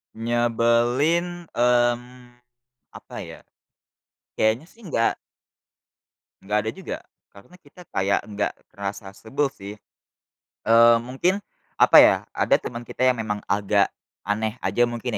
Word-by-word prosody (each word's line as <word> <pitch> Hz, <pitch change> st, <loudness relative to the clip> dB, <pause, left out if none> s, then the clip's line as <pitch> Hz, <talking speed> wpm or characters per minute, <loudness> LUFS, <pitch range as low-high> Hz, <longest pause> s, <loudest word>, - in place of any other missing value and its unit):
Nyebelin, 120 Hz, +9 st, +1 dB
mmm, 120 Hz, +1 st, 0 dB, 0.6 s
apa -, -, -12 dB
ya, -, -, -11 dB, 0.9 s
kayaknya 110 Hz, +7 st, +1 dB
sih 230 Hz, -, -22 dB
enggak 115 Hz, -8 st, 0 dB, 1.3 s
nggak 105 Hz, +2 st, 0 dB
ada 110 Hz, -, -1 dB
juga, -, -, -6 dB, 0.4 s
karena 100 Hz, -, -17 dB
kita 180 Hz, +1 st, -18 dB
kayak 100 Hz, +1 st, +1 dB
nggak 105 Hz, 0 st, -2 dB, 0.2 s
ngerasa 100 Hz, 0 st, -6 dB
sebel 140 Hz, +6 st, -1 dB
sih. 100 Hz, -5 st, -10 dB, 0.9 s
Eee, 115 Hz, +1 st, +7 dB
mungkin, 135 Hz, -, -1 dB, 0.4 s
apa -, -, +7 dB
ya, -, -, +6 dB, 0.2 s
ada -, -, +3 dB
teman 120 Hz, 0 st, -7 dB
kita 125 Hz, +2 st, -1 dB
yang 125 Hz, -2 st, +2 dB
memang 105 Hz, -1 st, -3 dB
agak 100 Hz, 0 st, +2 dB, 0.4 s
aneh 105 Hz, +3 st, -2 dB
aja 120 Hz, 0 st, +2 dB
mungkin 120 Hz, 0 st, -4 dB
120 Hz, 120 wpm, -23 LUFS, 110-125 Hz, 1.3 s, Eee